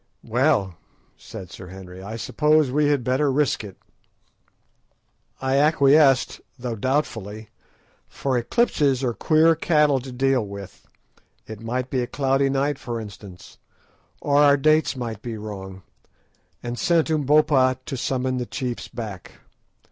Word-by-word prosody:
"Well," 110 - +1 0.4
said 90 -2 -10
Sir 95 - -10
Henry, 95 0 -11
"I 105 +4 -7
suppose 150 +3 +2
we 150 +2 +2
had 145 -3 +1
better 135 +4 +1
risk 140 -4 +1
it." 100 -3 -10 1.6
I 130 +1 0
acquiesced, 140 -2 +4 0.2
though 120 -2 -4
doubtfully, 110 -4 -3 0.6
for 135 -2 -2
eclipses 135 - +1
are 120 -2 0
queer 160 +5 +4
cattle 150 -4 +2
to 130 +1 -9
deal 130 -1 +1
with—it 100 +2 -13
might 125 +3 -3
be 130 - 0
a 120 - -3
cloudy 135 0 +1
night, 140 +1 0
for 120 -1 -5
instance, 100 -4 -11 0.6
or 145 -1 +1
our 145 -1 +6
dates 155 +1 +2
might 115 -4 -5
be 115 -2 -6
wrong—and 105 +4 -10
sent 165 -2 +2
Umbopa 145 -3 +3
to 140 - -4
summon 130 0 -1
the 125 -1 -3
chiefs 125 -2 -4
back. 105 -6 -8
130 Hz, 130 wpm, -23 LUFS, 110-145 Hz, 1.6 s, our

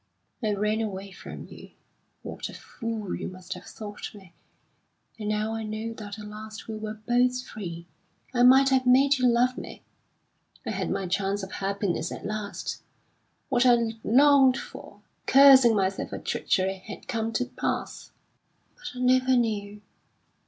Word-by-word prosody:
I 215 -1 +1
ran 210 +2 0
away 200 -2 -5
from - - -9
you. - - -13 0.5
What - - -6
a - - -10
fool 225 -4 -5
you - - -4
must 185 0 -7
have 180 - -11
thought 210 0 -8
me! 190 -4 -15 0.9
And 210 -1 -3
now 215 +1 -1
I 225 - -3
know 220 +1 -4
that 210 -2 -8
at 210 - -9
last 215 +1 -9
we 220 - -5
were 215 0 -5
both 245 +3 +1
free, 170 -6 -7 0.5
I 245 - +1
might 265 +2 +7
have 260 -1 +2
made 270 +2 +5
you 250 - +4
love 245 +1 +2
me. - - -10 0.8
I - - -2
had - - -2
my 195 - -2
chance 195 +2 -1
of 190 - -7
happiness 195 -3 -2
at - - -7
last; 210 0 -4 0.7
what 245 -2 +3
I'd 235 -3 +2
longed 270 +1 +5
for, - - -10 0.3
cursing 265 -4 +8
myself 195 -1 -1
for - - -5
treachery, 190 0 -1
had 210 - -9
come 225 -3 -2
to 250 +3 0
pass. 250 - -4 0.6
But 255 - -8
I - - -1
never 255 0 +4
knew. 210 -3 -2
220 Hz, 160 wpm, -27 LUFS, 205-250 Hz, 0.9 s, cursing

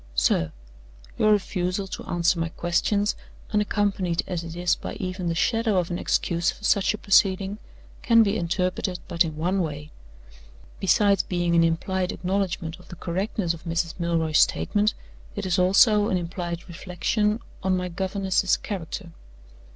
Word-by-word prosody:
"SIR 75 +6 +2 0.7
Your 215 - +4
refusal 185 -1 0
to 190 - -7
answer 175 0 +1
my 165 0 -1
questions, 200 +5 0 0.4
unaccompanied 200 -4 0
as 175 -2 -3
it 165 0 -7
is 175 0 +1
by - - -7
even 185 -1 -4
the 165 - 0
shadow 225 +2 +1
of 180 -1 0
an 175 - -2
excuse 170 +1 +1
for - - -7
such 200 0 +2
a - - -8
proceeding, 195 0 +2 0.4
can 230 -1 +5
be 200 0 0
interpreted 180 0 -1
but 170 -1 +2
in 160 -2 -5
one 180 +4 0
way. 150 -2 -5 0.9
Besides 200 0 +3
being 175 -1 -1
an 170 0 +5
implied 180 +3 0
acknowledgment 180 -3 -2
of 180 - -17
the - - -9
correctness 180 +1 -2
of 170 - -12
Mrs. 165 0 -1
Milroy's 165 -2 +1
statement, 210 0 +2 0.4
it - - -4
is 185 0 +1
also 205 +3 +5
an 185 - +1
implied 175 0 -5
reflection 195 +5 -1 0.2
on 185 -1 +1
my 180 0 -2
governess's 190 +1 0
character. 185 -2 -6
180 Hz, 155 wpm, -25 LUFS, 170-200 Hz, 0.9 s, can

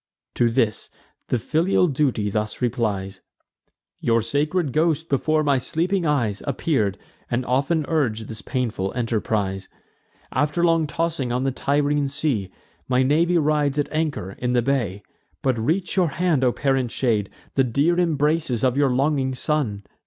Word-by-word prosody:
To 120 - +2
this, 115 -3 0 0.4
the - - +1
filial 165 - +2
duty 130 -8 0
thus 105 0 -2
replies: 105 -6 -2 0.8
"Your 115 -1 +2
sacred 145 - 0
ghost 160 0 +1
before 155 +3 +1
my 140 -3 +2
sleeping 170 +6 0
eyes 115 -9 0
Appear'd, 120 - 0 0.3
and 120 +1 -1
often 140 +5 +1
urg'd 115 -9 0
this 110 -1 -8
painful 115 -7 -2
enterprise. 105 -5 -1 0.6
After 150 +6 +1
long 165 -2 +3
tossing 155 -4 -2
on 125 +2 0
the 135 - +1
Tyrrhene 145 +1 +1
sea, 135 -9 -1 0.4
My 130 0 +3
navy 165 +6 +3
rides 150 -2 +1
at 145 - 0
anchor 155 - -1
in 125 0 -1
the 120 -1 +2
bay. 115 -7 -1 0.4
But 130 -4 +1
reach 165 - 0
your 185 -3 +3
hand, 155 -3 +1
O 125 - +4
parent 135 -2 0
shade, 110 -5 0
nor - - -28
shun - - -27
The 135 - +3
dear 145 +9 +2
embraces 150 -6 +1
of 130 -1 +2
your 140 -1 +3
longing 135 0 +1
son!" 125 -8 -1
135 Hz, 155 wpm, -23 LUFS, 115-155 Hz, 0.8 s, O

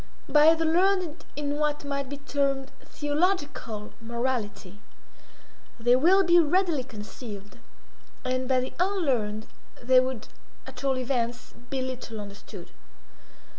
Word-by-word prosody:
By 305 +2 +6
the 325 0 0
learned 355 0 +2
in 290 0 -2
what 295 -1 0
might 280 -1 -2
be 285 - -5
termed 275 -1 -1
theological 290 - -1
morality 230 -4 -3 1.0
they 240 +2 +5
will 360 +9 +5
be 345 -1 +6
readily 335 -3 +2
conceived, 210 -3 -9 0.7
and 255 0 0
by 255 -1 +3
the 255 - -5
unlearned 260 - 0 0.3
they 255 +1 +5
would, 255 -3 -2 0.4
at 250 - -10
all 270 -1 +2
events, 245 -2 -2 0.2
be 265 -1 -1
little 250 -4 -5
understood. 200 -2 -10
265 Hz, 120 wpm, -27 LUFS, 235-300 Hz, 1.0 s, By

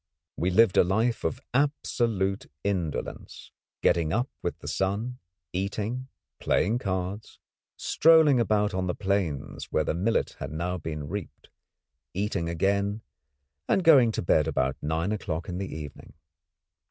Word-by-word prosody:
We 90 - 0
lived 100 +1 +4
a - - +8
life 110 +6 +1
of 125 - -1
absolute 115 -8 0 0.2
indolence, 90 -7 -3 0.3
getting 80 -2 +3
up 120 +7 0
with - - -3
the - - -10
sun, 110 +7 -1 0.3
eating, 105 +7 -2 0.3
playing 115 +4 +1
cards, 95 0 -4 0.4
strolling 160 -5 +5
about 105 -2 +2
on 95 0 -1
the 90 - -1
plains 95 -8 -2
where 80 - 0
the - - -1
millet 100 +7 0
had - - -5
now 90 +3 -2
been 75 -2 -5
reaped, 100 +2 -7 0.7
eating 95 -4 -1
again 100 +5 0 0.7
and 190 - +3
going 135 -9 +7
to - - -2
bed 80 -2 +3
about 65 -4 0
nine 80 +6 -1
o'clock 85 -6 -3
in 90 0 -4
the 95 - -4
evening. 75 -2 -8
95 Hz, 140 wpm, -27 LUFS, 85-115 Hz, 0.7 s, a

